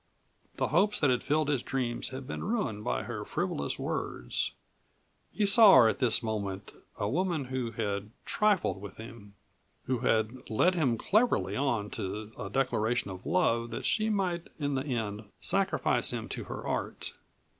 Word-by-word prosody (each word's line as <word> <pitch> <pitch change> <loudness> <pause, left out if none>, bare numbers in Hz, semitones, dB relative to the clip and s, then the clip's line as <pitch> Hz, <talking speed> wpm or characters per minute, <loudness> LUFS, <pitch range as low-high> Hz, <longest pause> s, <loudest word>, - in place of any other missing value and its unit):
The - - 0
hopes 195 +8 +3
that 145 -4 +4
had 125 - +1
filled 150 0 +1
his 140 -4 +1
dreams 125 -3 -2
had 130 0 -6
been 145 - -5
ruined 180 - -1
by - - -1
her - - -5
frivolous 70 - -2
words; - - -2 0.8
he 210 - +1
saw 205 0 +8
her 120 -4 +8
at - - -2
this 125 -2 +2
moment 100 -3 -3 0.3
a 100 - -1
woman 165 - 0
who 130 -2 -2
had 100 -2 -2 0.2
trifled 205 - +1
with 100 -2 -9
him, 110 -3 -11 0.5
who 125 -1 -1
had 115 +1 0
led 170 +12 +3
him 135 -10 +1
cleverly 220 - +2
on 120 -7 0
to 105 +3 -5
a 100 - -6
declaration 120 -3 0
of 95 0 -8
love 120 -10 +2
that - - -5
she 215 0 +2
might 185 -5 -1
in 145 -2 -1
the 135 +1 -1
end 110 -5 -3
sacrifice - - +1
him - - -4
to - - -5
her - - -6
art. - - -3
125 Hz, 165 wpm, -30 LUFS, 110-160 Hz, 0.8 s, saw